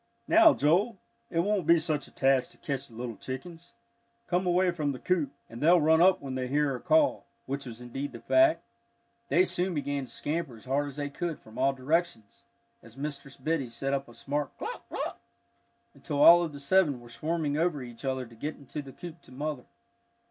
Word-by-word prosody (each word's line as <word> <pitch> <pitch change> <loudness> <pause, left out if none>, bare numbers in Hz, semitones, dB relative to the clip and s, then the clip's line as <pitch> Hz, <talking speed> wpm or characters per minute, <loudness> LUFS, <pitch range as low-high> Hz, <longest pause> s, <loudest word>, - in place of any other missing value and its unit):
"Now, 330 -2 +7
Joel, 190 +9 +2 0.3
it 165 - +1
won't 195 -3 0
be 170 0 +7
such 155 -3 -2
a - - -17
task 135 -1 +2
to - - -17
catch 140 -5 -4
the 115 - -16
little 120 -1 -5
chickens. 165 +6 -8 0.5
Come 180 -1 0
away 180 +1 +3
from 150 -5 -1
the 130 - -8
coop, 165 -7 0 0.2
and 115 +1 -10
they'll 170 +4 +6
run 160 +1 +4
up 185 -1 +5
when 135 -2 -5
they 130 -1 -2
hear 145 +2 +2
her 130 - -3
call," 315 -2 +2 0.2
which 140 0 -4
was 115 0 -9
indeed 135 +4 -5
the - - -9
fact. 325 0 +4 0.7
They 180 +2 +4
soon 180 0 -1
began 145 -2 -2
to - - -15
scamper 150 -4 -3
as 110 - -17
hard 140 +3 0
as 140 - -8
they 145 -1 -4
could 165 +2 -3
from 110 - -12
all 135 +1 +3
directions 135 - -2 0.4
as - - -16
Mistress 140 -1 -6
Biddy 155 -6 -1
set 135 +4 -3
up 140 0 -1
a 120 - -14
smart 145 0 -3
"cluck, - - -6
cluck," - - -4 0.7
until 145 0 -1
all 175 +1 +9
of 170 -3 -2
the 145 - -9
seven 145 -2 +3
were 120 - -14
swarming 150 +5 -2
over 155 -3 0
each 120 0 -11
other 130 -1 -1
to 115 -1 -15
get 150 +7 -4
into 145 +2 -7
the 135 -2 -11
coop 170 -1 -10
to - - -18
mother. 145 0 -4
145 Hz, 210 wpm, -29 LUFS, 130-170 Hz, 0.7 s, all